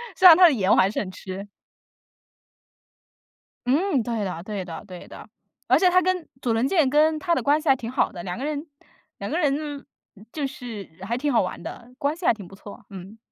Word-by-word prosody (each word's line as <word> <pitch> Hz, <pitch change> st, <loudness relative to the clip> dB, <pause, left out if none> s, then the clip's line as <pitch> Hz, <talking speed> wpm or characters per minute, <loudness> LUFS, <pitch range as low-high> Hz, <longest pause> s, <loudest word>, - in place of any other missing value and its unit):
虽 375 Hz, -, +7 dB
然 330 Hz, -2 st, +10 dB
他 370 Hz, -, +6 dB
的 330 Hz, -, +7 dB
颜 200 Hz, -7 st, 0 dB
我 -, -, +6 dB
还 190 Hz, -, +4 dB
是 -, -, -2 dB
很 190 Hz, -, -4 dB
吃。 190 Hz, +1 st, -8 dB, 2.2 s
嗯， 295 Hz, 0 st, +2 dB
对 230 Hz, 0 st, -3 dB
呀， 185 Hz, -5 st, -3 dB
对 200 Hz, +1 st, -5 dB
的 165 Hz, -3 st, -8 dB
对 180 Hz, -2 st, -10 dB
的。 -, -, -11 dB, 0.4 s
而 -, -, +5 dB
且 365 Hz, -, +4 dB
他 365 Hz, +1 st, +4 dB
跟 365 Hz, -2 st, -1 dB, 0.2 s
佐 235 Hz, -2 st, 0 dB
藤 225 Hz, +3 st, +1 dB
健 315 Hz, -3 st, +2 dB
跟 310 Hz, +2 st, +3 dB
他 340 Hz, 0 st, +1 dB
的 -, -, -1 dB
关 295 Hz, +2 st, +3 dB
系 310 Hz, -, -9 dB
还 270 Hz, -, +6 dB
挺 235 Hz, -2 st, -6 dB
好 -, -, +1 dB
的， 175 Hz, -, -7 dB
2 180 Hz, +2 st, -5 dB
个 270 Hz, -, -4 dB
人 300 Hz, +1 st, -3 dB, 0.5 s
2 -, -, -5 dB
个 330 Hz, -, -1 dB
人 290 Hz, -2 st, -1 dB, 0.5 s
就 295 Hz, -3 st, -2 dB
是 230 Hz, -7 st, -8 dB
还 235 Hz, +5 st, -2 dB
挺 290 Hz, +2 st, -1 dB
好 -, -, +4 dB
玩 185 Hz, -, -4 dB
的， 240 Hz, +1 st, -9 dB
关 285 Hz, +2 st, -1 dB
系 345 Hz, -, -8 dB
还 -, -, +5 dB
挺 205 Hz, -4 st, -10 dB
不 195 Hz, -, -13 dB
错， 205 Hz, 0 st, -12 dB
嗯。 195 Hz, +3 st, -10 dB
255 Hz, 230 characters per minute, -24 LUFS, 200-305 Hz, 2.2 s, 然